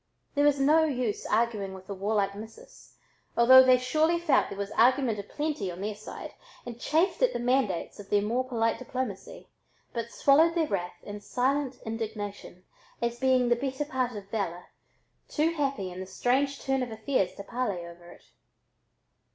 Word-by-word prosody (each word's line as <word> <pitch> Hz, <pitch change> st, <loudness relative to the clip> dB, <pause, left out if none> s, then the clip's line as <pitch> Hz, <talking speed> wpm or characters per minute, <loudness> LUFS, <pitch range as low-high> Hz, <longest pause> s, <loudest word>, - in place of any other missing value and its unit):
There 285 Hz, 0 st, +2 dB
was 290 Hz, -1 st, +3 dB
no 305 Hz, +4 st, +5 dB
use 250 Hz, -8 st, -2 dB
arguing 215 Hz, -4 st, 0 dB
with 190 Hz, 0 st, -12 dB
the 200 Hz, -, -6 dB
warlike 200 Hz, 0 st, 0 dB
"missus," 225 Hz, -, -12 dB, 0.4 s
although 260 Hz, +2 st, +9 dB
they 255 Hz, -1 st, +6 dB
surely 310 Hz, +7 st, +1 dB
felt 340 Hz, -3 st, +2 dB
there 195 Hz, -, -7 dB
was 200 Hz, 0 st, -4 dB
argument 245 Hz, -2 st, +3 dB
"a -, -, -4 dB
plenty" 290 Hz, -4 st, -3 dB
on 175 Hz, -, -9 dB
their 210 Hz, +2 st, -3 dB
side 210 Hz, +1 st, -9 dB, 0.3 s
and 240 Hz, -1 st, -8 dB
chafed 325 Hz, +9 st, +1 dB
at -, -, +3 dB
the -, -, -2 dB
mandates 240 Hz, -9 st, 0 dB
of 200 Hz, -1 st, -10 dB
their 205 Hz, -1 st, +2 dB
more 235 Hz, +5 st, 0 dB
polite 230 Hz, -3 st, 0 dB
diplomacy, 255 Hz, -, -5 dB, 0.5 s
but 230 Hz, -1 st, -3 dB
swallowed 315 Hz, +7 st, +4 dB
their 330 Hz, -2 st, +2 dB
wrath 180 Hz, -8 st, -3 dB
in 205 Hz, 0 st, -8 dB
silent 265 Hz, +3 st, -1 dB
indignation, 210 Hz, -4 st, -6 dB, 0.4 s
as 235 Hz, 0 st, -2 dB
being 260 Hz, -1 st, +3 dB
the 240 Hz, -, +4 dB
better 265 Hz, +3 st, -3 dB
part 255 Hz, -5 st, -2 dB
of 200 Hz, -2 st, -8 dB
valor, 180 Hz, -5 st, -3 dB, 0.6 s
too 315 Hz, +2 st, +1 dB
happy 275 Hz, -, -2 dB
in 180 Hz, -, -8 dB
the 185 Hz, -, -6 dB
strange 270 Hz, +8 st, 0 dB
turn 270 Hz, -1 st, 0 dB
of 250 Hz, -, -3 dB
affairs 220 Hz, -2 st, -1 dB
to 200 Hz, -, -8 dB
parley 205 Hz, -6 st, -3 dB
over 170 Hz, 0 st, -13 dB
it. -, -, -15 dB
240 Hz, 175 wpm, -28 LUFS, 205-275 Hz, 0.6 s, although